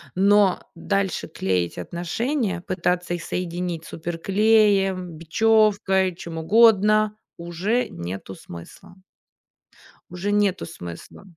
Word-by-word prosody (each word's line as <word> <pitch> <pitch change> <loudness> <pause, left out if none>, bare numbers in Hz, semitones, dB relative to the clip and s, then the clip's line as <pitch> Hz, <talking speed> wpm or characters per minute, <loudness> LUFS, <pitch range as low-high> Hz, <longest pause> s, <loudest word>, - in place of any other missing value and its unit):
но 200 0 +4
дальше 195 +2 -2
клеить 90 - -2
отношения, 190 - -2
пытаться 180 -1 -1
их 170 - -7
соединить 175 -2 -4
суперклеем, 195 +2 +1
бечевкой, 190 +1 +2
чем 170 -2 -8
угодно, 215 +3 +4 0.2
уже 175 +8 -1
нету 95 +2 -7
смысла. 85 - -12 1.2
Уже 180 +3 -3
нету 205 -2 +1
смысла. 85 - -10
185 Hz, 90 wpm, -23 LUFS, 170-205 Hz, 1.2 s, но